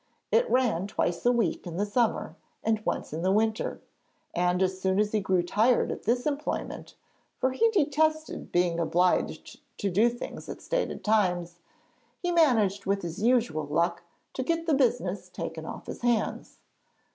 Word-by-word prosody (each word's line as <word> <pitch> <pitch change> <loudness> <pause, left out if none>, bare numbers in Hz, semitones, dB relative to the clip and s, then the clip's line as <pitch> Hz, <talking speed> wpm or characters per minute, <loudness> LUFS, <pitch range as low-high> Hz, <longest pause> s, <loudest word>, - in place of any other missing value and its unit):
It 485 +1 +3
ran 230 -8 +2
twice 175 -3 -1
a - - +6
week 225 -8 0
in 170 -1 -6
the 205 - +1
summer 225 +2 0 0.3
and 220 -1 0
once - - -2
in 160 - -3
the 185 +2 +2
winter; 220 +2 0 0.5
and 180 +1 +2
as 185 0 -1
soon 190 +1 +1
as 210 0 +2
he 215 - +2
grew 185 -3 +1
tired 220 +7 +2
of - - -7
this 245 +3 +1
employment, 300 0 -3 0.4
for 260 - +1
he 455 - +3
detested 315 -4 0
being 175 -1 +2
obliged 175 +2 0 0.2
to 200 - -1
do 215 +7 +4
things 240 +1 -7
at - - -6
stated - - -2
times, 175 -5 +1 0.6
he 355 -2 -2
managed 220 - +3
with 195 -1 0
his 170 +2 -5
usual 230 -10 +2
luck 170 +3 0 0.3
to - - -3
get 330 +5 -1
the 325 - +2
business 245 -8 0
taken - - -6
off - - -7
his - - -7
hands. 240 -2 -1
215 Hz, 170 wpm, -28 LUFS, 180-255 Hz, 0.6 s, a